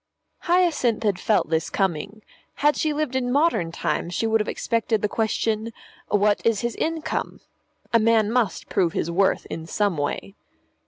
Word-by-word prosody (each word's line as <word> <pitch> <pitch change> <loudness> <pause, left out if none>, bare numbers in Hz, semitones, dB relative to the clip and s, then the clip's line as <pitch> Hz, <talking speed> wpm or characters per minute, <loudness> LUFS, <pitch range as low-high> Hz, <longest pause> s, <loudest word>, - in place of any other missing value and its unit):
Hyacinth 335 -11 +2
had 205 -4 +1
felt 210 -7 +1
this 160 0 0
coming. 195 +3 -2 0.3
Had 295 +1 +3
she 310 - 0
lived 295 -3 -2
in 245 -1 0
modern 280 - +2
times 170 0 -2
she - - 0
would 225 -1 +2
have 210 - -4
expected 225 -2 -1
the - - +3
question, 220 +1 -1 0.4
"What 205 0 +2
is 230 -3 +2
his 235 -1 -2
income?" 325 -1 -2 0.5
A 230 - +6
man 220 -1 +3
must 235 -5 0
prove 170 -3 +1
his 170 - -1
worth 190 +3 +2
in 160 0 -5
some 200 -2 0
way. 145 +6 -3
220 Hz, 165 wpm, -24 LUFS, 195-245 Hz, 0.5 s, A